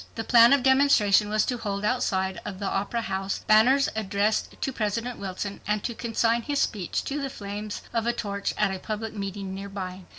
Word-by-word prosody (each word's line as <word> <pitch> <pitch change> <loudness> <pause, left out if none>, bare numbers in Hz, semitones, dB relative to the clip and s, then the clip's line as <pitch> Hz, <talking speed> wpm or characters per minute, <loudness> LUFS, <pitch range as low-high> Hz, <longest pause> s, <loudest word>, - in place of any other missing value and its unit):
The 225 - -3
plan 235 0 +7
of 280 -2 +4
demonstration 265 -7 +4
was 215 0 +2
to 245 -2 -2
hold 200 -1 -3
outside 190 -6 0
of 195 - -6
the 200 - -5
Opera 205 +4 -1
House 190 0 -2
banners 250 +6 +5
addressed 210 0 -1
to 270 - -2
President 230 +2 -2
Wilson, 195 +1 -5
and 210 -1 0
to 240 - -2
consign 230 0 0
his 285 +4 -2
speech 195 -6 -1
to 285 +1 -3
the 275 - -3
flames 205 -2 -6
of 230 0 0
a - - +4
torch 205 -4 -3
at 210 -2 +1
a 190 - -5
public 215 +2 -4
meeting 195 -2 -5
nearby. 190 -2 -6
210 Hz, 195 wpm, -26 LUFS, 200-235 Hz, -, plan